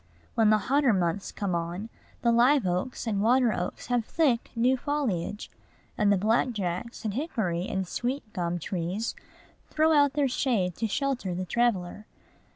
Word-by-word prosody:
When 220 Hz, -2 st, +4 dB
the 215 Hz, -, +5 dB
hotter 265 Hz, +4 st, +2 dB
months 185 Hz, +1 st, -1 dB
come 200 Hz, -4 st, -3 dB
on, 170 Hz, +5 st, -3 dB, 0.3 s
the 235 Hz, -, +4 dB
live 245 Hz, +1 st, +4 dB
oaks 180 Hz, +10 st, -2 dB
and 205 Hz, -3 st, 0 dB
water 240 Hz, +1 st, +4 dB
oaks 180 Hz, +1 st, -4 dB
have 245 Hz, -2 st, +1 dB
thick, 255 Hz, -2 st, +1 dB
new 245 Hz, +3 st, +3 dB
foliage, 240 Hz, -, -2 dB, 0.4 s
and 205 Hz, -1 st, +3 dB
the 200 Hz, -, +4 dB
black 225 Hz, +5 st, +2 dB
jacks 200 Hz, +4 st, -4 dB
and 210 Hz, -, -1 dB
hickory 195 Hz, -, -2 dB
and 190 Hz, -1 st, -2 dB
sweet 255 Hz, +9 st, -2 dB
gum 175 Hz, -2 st, -1 dB
trees 180 Hz, +5 st, -3 dB, 0.6 s
throw 315 Hz, +1 st, +3 dB
out 285 Hz, -2 st, +4 dB
their 290 Hz, -2 st, +2 dB
shade 230 Hz, -8 st, 0 dB
to 225 Hz, -, -1 dB
shelter 245 Hz, -5 st, -1 dB
the 185 Hz, +1 st, -3 dB
traveller. 210 Hz, -2 st, 0 dB
220 Hz, 160 wpm, -27 LUFS, 185-255 Hz, 0.6 s, the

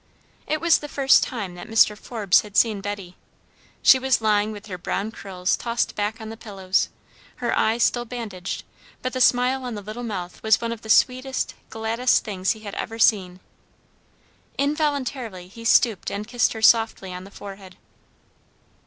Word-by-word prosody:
It 310 Hz, -, 0 dB
was 335 Hz, -1 st, +4 dB
the 295 Hz, -, -7 dB
first 275 Hz, -2 st, +4 dB
time 205 Hz, -8 st, -4 dB
that 175 Hz, 0 st, -10 dB
Mr. 220 Hz, -1 st, +4 dB
Forbes 210 Hz, -4 st, +2 dB
had 205 Hz, -1 st, -7 dB
seen 215 Hz, -4 st, +3 dB
Betty. 200 Hz, -3 st, -6 dB, 0.7 s
She 260 Hz, -, +7 dB
was 265 Hz, 0 st, +2 dB
lying 215 Hz, -1 st, +2 dB
with 205 Hz, -1 st, -9 dB
her 185 Hz, -4 st, -7 dB
brown 200 Hz, +4 st, -3 dB
curls 185 Hz, -4 st, -2 dB
tossed 235 Hz, 0 st, -1 dB
back 210 Hz, +2 st, -2 dB
on 220 Hz, -1 st, -7 dB
the 225 Hz, -, -7 dB
pillows, 195 Hz, -4 st, -1 dB, 0.5 s
her -, -, -1 dB
eyes 230 Hz, +2 st, +2 dB
still 240 Hz, -1 st, +1 dB
bandaged; 220 Hz, -7 st, -5 dB, 0.4 s
but 255 Hz, -, -2 dB
the 255 Hz, -, -2 dB
smile 250 Hz, +2 st, +3 dB
on 245 Hz, -3 st, -4 dB
the 205 Hz, -, -6 dB
little 215 Hz, +4 st, -7 dB
mouth 190 Hz, -7 st, -5 dB
was 220 Hz, -1 st, +4 dB
one 230 Hz, 0 st, -3 dB
of 230 Hz, -1 st, -6 dB
the 220 Hz, -, -11 dB
sweetest, 255 Hz, +3 st, +2 dB, 0.2 s
gladdest 225 Hz, +3 st, +1 dB
things 195 Hz, -3 st, -1 dB
he 220 Hz, -, -14 dB
had 205 Hz, -2 st, -7 dB
ever 225 Hz, -, -5 dB
seen. 190 Hz, -5 st, +2 dB, 1.2 s
Involuntarily 275 Hz, -, -1 dB
he 230 Hz, +5 st, -12 dB
stooped 225 Hz, -3 st, +3 dB
and 210 Hz, +1 st, -5 dB
kissed 245 Hz, 0 st, +1 dB
her 220 Hz, -1 st, -7 dB
softly 225 Hz, -5 st, +3 dB
on 180 Hz, 0 st, -7 dB
the 195 Hz, -, -12 dB
forehead. 195 Hz, -2 st, -11 dB
220 Hz, 175 wpm, -23 LUFS, 200-245 Hz, 1.2 s, She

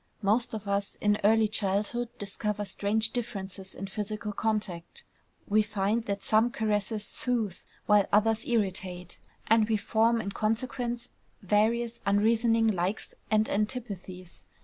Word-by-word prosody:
Most 220 Hz, +3 st, +2 dB
of 210 Hz, -1 st, -7 dB
us 200 Hz, 0 st, -1 dB
in 210 Hz, 0 st, +1 dB
early 220 Hz, +1 st, +5 dB
childhood 210 Hz, +3 st, -1 dB
discover 205 Hz, +1 st, -3 dB
strange 210 Hz, +3 st, +1 dB
differences 195 Hz, -5 st, -4 dB
in 195 Hz, -, -5 dB
physical 210 Hz, +1 st, -4 dB
contact; 210 Hz, -, -2 dB, 0.4 s
we 215 Hz, +1 st, +4 dB
find 210 Hz, +2 st, -1 dB
that 200 Hz, -1 st, -3 dB
some 220 Hz, +2 st, +4 dB
caresses 215 Hz, -2 st, -1 dB
soothe, 230 Hz, -7 st, -1 dB, 0.3 s
while 210 Hz, -2 st, +4 dB
others 220 Hz, +2 st, +3 dB
irritate; 185 Hz, -6 st, -2 dB, 0.3 s
and 220 Hz, 0 st, +4 dB
we 220 Hz, -, +3 dB
form 225 Hz, +2 st, +2 dB
in 200 Hz, -3 st, -3 dB
consequence 235 Hz, +3 st, -2 dB, 0.3 s
various 230 Hz, +4 st, +1 dB
unreasoning 225 Hz, +3 st, +3 dB
likes 190 Hz, 0 st, -1 dB, 0.2 s
and 215 Hz, 0 st, +3 dB
antipathies. 200 Hz, -5 st, -4 dB
215 Hz, 125 wpm, -29 LUFS, 200-225 Hz, 0.4 s, early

